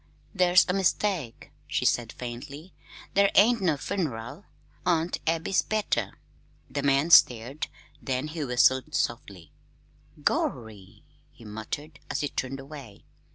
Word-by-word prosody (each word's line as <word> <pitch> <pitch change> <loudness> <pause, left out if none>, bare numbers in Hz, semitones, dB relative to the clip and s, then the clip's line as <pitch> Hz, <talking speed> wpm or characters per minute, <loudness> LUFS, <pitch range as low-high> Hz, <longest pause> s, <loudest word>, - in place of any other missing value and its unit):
"There's 180 -2 +5
a 180 - 0
mistake," 185 - -1 0.2
she - - -1
said 120 -2 +1
faintly. 140 +8 -8 0.4
"There 200 0 +4
ain't 230 +2 +5
no 165 -6 +1
fun'ral. 145 - -4 0.4
Aunt 170 -1 0
Abby's 165 +3 +1
better." 120 - -2 0.5
The 140 - -2
man 140 +4 +2
stared, 125 0 +5 0.3
then 130 +2 -2
he 155 0 -4
whistled 130 +3 +2
softly. 100 - -3 0.7
"Gorry!" 105 -5 -2 0.3
he 115 - -16
muttered, 125 +8 -7
as - - -2
he 145 - -1
turned 135 +1 -4
away. 135 -6 -11
140 Hz, 120 wpm, -27 LUFS, 120-170 Hz, 0.7 s, There's